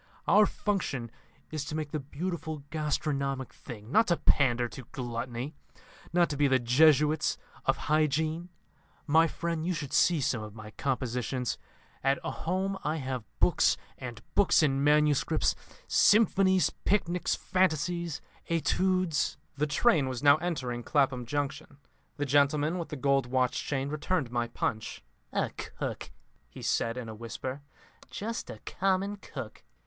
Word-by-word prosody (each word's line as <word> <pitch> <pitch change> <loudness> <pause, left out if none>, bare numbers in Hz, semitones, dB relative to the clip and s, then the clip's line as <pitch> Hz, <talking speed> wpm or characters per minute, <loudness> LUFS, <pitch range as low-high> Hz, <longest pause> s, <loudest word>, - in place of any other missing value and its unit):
Our 210 0 +6
function 145 - -2 0.4
is 155 -2 -2
to 150 - -5
make 155 -2 -3
the 155 - -1
beautiful 155 +1 -5
gastronomic 140 -3 -1
thing, 115 -3 -10
not 220 +7 +5
to 170 -2 +2
pander 120 -4 +3
to 130 +1 -10
gluttony, 120 +2 -4 0.6
not 175 0 +4
to 145 - -3
be 145 0 +4
the 130 -1 +4
Jesuits 150 +5 +4 0.3
of - - +3
hygiene. 155 +3 0 0.6
My 160 +2 +5
friend, 170 0 -3
you 180 +1 0
should 145 -4 -5
see 170 -2 +4
some 120 -4 0
of 105 0 -8
my 105 -1 -9
compositions. 125 0 -2 0.4
At 135 0 +3
home 190 +3 -2
I 155 +1 0
have 130 -6 -4
books - - +4 0.2
and 120 -2 -8
books 200 -4 +4
in 135 -2 +2
manuscript, 150 -1 +3 0.3
Symphonies, 195 -3 +4
Picnics, 180 -3 +1
Fantasies, 170 -2 0 0.3
Etudes..." 170 +1 +1 0.2
The 150 +2 0
train 150 - +3
was 130 +1 -5
now 145 0 +7
entering 130 -8 -3
Clapham 130 -2 +1
Junction. 145 +2 -3 0.4
The 145 - -1
gentleman 145 +4 +2
with 170 - -5
the - - -4
gold 135 -1 +2
watch 125 0 +1
chain 135 -1 -1
returned 150 -3 -1
my 120 -1 0
Punch. 110 -1 -3 0.3
"A - - 0
cook," - - -6 0.4
he - - -11
said 115 +1 0
in 125 -2 -5
a 110 - -6
whisper; 125 +5 -6 0.5
"just 225 +3 -4
a - - -7
common 195 +2 0
cook!" 130 - -8
145 Hz, 145 wpm, -29 LUFS, 130-170 Hz, 0.6 s, now